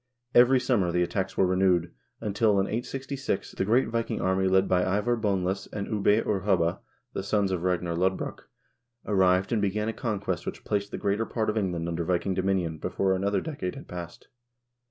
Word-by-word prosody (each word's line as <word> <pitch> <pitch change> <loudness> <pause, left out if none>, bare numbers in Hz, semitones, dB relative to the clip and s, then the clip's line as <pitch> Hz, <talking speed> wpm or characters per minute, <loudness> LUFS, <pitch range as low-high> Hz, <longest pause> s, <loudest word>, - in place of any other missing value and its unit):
Every 125 +2 +6
summer 105 -9 +1
the 90 +1 +2
attacks 95 +2 -2
were 95 - +4
renewed, 90 -2 +2 0.3
until, 105 -1 +2
in 95 - +2
866, 130 +1 -3
the - - -2
great 115 +4 +3
Viking 115 0 -2
army 95 0 +1
led 95 +1 +3
by 90 -1 +3 0.2
Ivar 120 +3 +1
Boneless 95 -3 -1
and 100 -1 -3
Ubbe 105 +1 +2
or 100 -2 +1
Hubba, 90 -4 +1 0.3
the - - -2
sons 100 0 +1
of 90 -3 -1
Ragnar 90 -1 0
Lodbrok, 95 +2 -2 0.6
arrived 95 -2 +3
and 115 -3 +1
began 105 +2 0
a - - -2
conquest 100 -7 -3
which - - -5
placed 100 -1 -1
the - - -5
greater 105 +3 0
part 110 -2 0
of - - -7
Eng 95 -4 +1
land 85 -1 -3
under 85 0 -2
Viking 90 +2 0
dominion 95 -4 0
before 95 +4 0
another 100 +2 0
decade 140 - -4
had - - -10
passed. 85 -1 -8
95 Hz, 190 wpm, -27 LUFS, 90-105 Hz, 0.6 s, Every